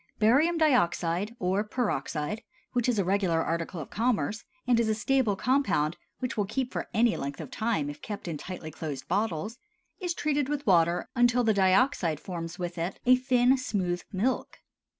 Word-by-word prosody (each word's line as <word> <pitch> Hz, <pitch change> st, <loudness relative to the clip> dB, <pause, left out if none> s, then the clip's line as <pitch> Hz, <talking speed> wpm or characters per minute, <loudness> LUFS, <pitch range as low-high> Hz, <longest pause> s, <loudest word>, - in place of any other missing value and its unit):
Barium 280 Hz, +11 st, +4 dB
dioxide 205 Hz, -, +2 dB
(or 190 Hz, +1 st, 0 dB
peroxide), 210 Hz, -, -2 dB, 0.3 s
which 245 Hz, -1 st, +1 dB
is 240 Hz, -, +1 dB
a 195 Hz, -, +1 dB
regular 185 Hz, -4 st, +1 dB
article 165 Hz, +1 st, -2 dB
of 150 Hz, -, -8 dB
commerce, 220 Hz, -, 0 dB, 0.2 s
and 245 Hz, -2 st, +3 dB
is 230 Hz, -2 st, +2 dB
a 215 Hz, -, +2 dB
stable 235 Hz, -1 st, +1 dB
compound 195 Hz, -, +1 dB, 0.2 s
which 250 Hz, -2 st, -3 dB
will 205 Hz, -3 st, +1 dB
keep 250 Hz, +4 st, -2 dB
for -, -, -3 dB
any 230 Hz, 0 st, +3 dB
length 140 Hz, +1 st, -5 dB
of -, -, -7 dB
time 220 Hz, -, 0 dB
if 145 Hz, -, -7 dB
kept 205 Hz, -4 st, -6 dB
in 165 Hz, -, -3 dB
tightly 175 Hz, -3 st, -7 dB
closed 150 Hz, -3 st, -6 dB
bottles, 205 Hz, +3 st, -1 dB, 0.4 s
is 355 Hz, -3 st, -2 dB
treated 290 Hz, -2 st, 0 dB
with 290 Hz, -1 st, -2 dB
water 170 Hz, -3 st, +3 dB
until 245 Hz, 0 st, +4 dB
the 220 Hz, -1 st, +3 dB
dioxide 190 Hz, -, +3 dB
forms 170 Hz, -1 st, -6 dB
with 175 Hz, -1 st, -4 dB
it 175 Hz, +3 st, -3 dB
a 255 Hz, +1 st, +7 dB
thin, 250 Hz, 0 st, +3 dB
smooth 180 Hz, -8 st, -1 dB
milk. 220 Hz, +6 st, -1 dB
210 Hz, 175 wpm, -28 LUFS, 175-245 Hz, 0.4 s, a